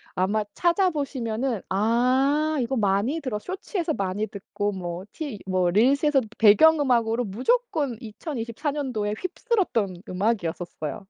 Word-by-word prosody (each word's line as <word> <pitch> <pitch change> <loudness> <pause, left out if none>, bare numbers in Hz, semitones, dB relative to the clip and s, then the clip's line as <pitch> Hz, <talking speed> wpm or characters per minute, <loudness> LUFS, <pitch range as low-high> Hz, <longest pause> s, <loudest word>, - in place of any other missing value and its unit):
아마 205 +4 +1
찾아 360 +2 +3
보시면은 255 - -2
'아 260 +9 +2
이거 240 +3 -1
많이 210 +9 +1
들어' 250 -6 -3
쇼츠에서 365 - -3
많이 195 0 -2
듣고 205 0 -4
뭐 180 -1 -5
티 285 -9 -5
뭐 185 -2 +1
릴스에서 270 - +3 0.2
배경음악으로 240 -1 +5
무조건 285 - 0
2024 235 +3 -4
년도에 245 -8 -2
휩쓸었던 345 - -1
음악이었었어요. 180 -3 -2
235 Hz, 285 characters per minute, -25 LUFS, 205-295 Hz, 0.2 s, 배경음악으로